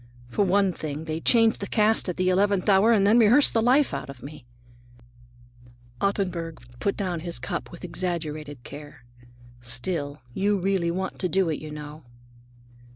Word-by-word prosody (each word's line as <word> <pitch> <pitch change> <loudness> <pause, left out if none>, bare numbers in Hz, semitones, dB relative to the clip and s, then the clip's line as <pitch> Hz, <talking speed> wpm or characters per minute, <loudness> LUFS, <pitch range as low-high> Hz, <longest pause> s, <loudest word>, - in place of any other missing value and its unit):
"For 205 - +1
one 195 0 +2
thing, 155 -1 -6
they 160 0 -3
change 225 +4 +3
the 200 - -4
cast 215 -2 +2
at 180 - -4
the 185 0 +1
eleventh 195 +1 +2
hour 205 +3 +5
and 205 -4 +4
then 220 +4 +5
rehearse 240 +6 +6
the 225 - +2
life 255 - +3
out 140 0 -5
of 130 -3 -11
me." 140 -3 -10 1.5
Ottenburg 180 -5 -1 0.2
put 200 +8 -1
down 185 -4 -2
his 170 -2 -3
cup 120 -1 -5
with - - -12
exaggerated 155 -6 -4
care. 145 -2 -11 0.6
"Still, 145 +4 -4
you 200 +5 +1
really 185 -2 0
want 185 +2 -3
to 185 - -1
do 190 +1 +1
it, 155 - -2
you 155 - -7
know." 150 0 -9
180 Hz, 165 wpm, -25 LUFS, 150-200 Hz, 1.5 s, rehearse